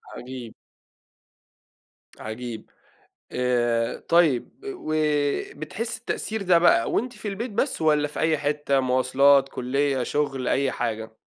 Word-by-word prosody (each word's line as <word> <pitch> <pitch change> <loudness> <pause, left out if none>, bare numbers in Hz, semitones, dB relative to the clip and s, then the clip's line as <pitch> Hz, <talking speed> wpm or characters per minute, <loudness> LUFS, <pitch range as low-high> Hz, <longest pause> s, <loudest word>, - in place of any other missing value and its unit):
عجيب. 125 -2 -8 1.7
عجيب. 110 0 -7 0.6
آآ، 120 -2 0
طيب، 165 -7 +3 0.2
وبتحسي 155 - -2
التأثير 220 -2 -3
ده 180 -3 +4
بقى 140 -9 +4
وأنتِ 250 +2 -1
في 210 -1 -8
البيت 215 +4 -4
بس 230 - -1
والّا 150 -1 +3
في 150 - -7
أي 160 -1 +2
حتة، 145 -1 0
مواصلات، 135 +2 +4
كلية، 135 +1 0
شغل، 135 -2 -1
أي 135 -1 +1
حاجة؟ 110 0 -4
140 Hz, 110 wpm, -25 LUFS, 125-160 Hz, 1.7 s, ده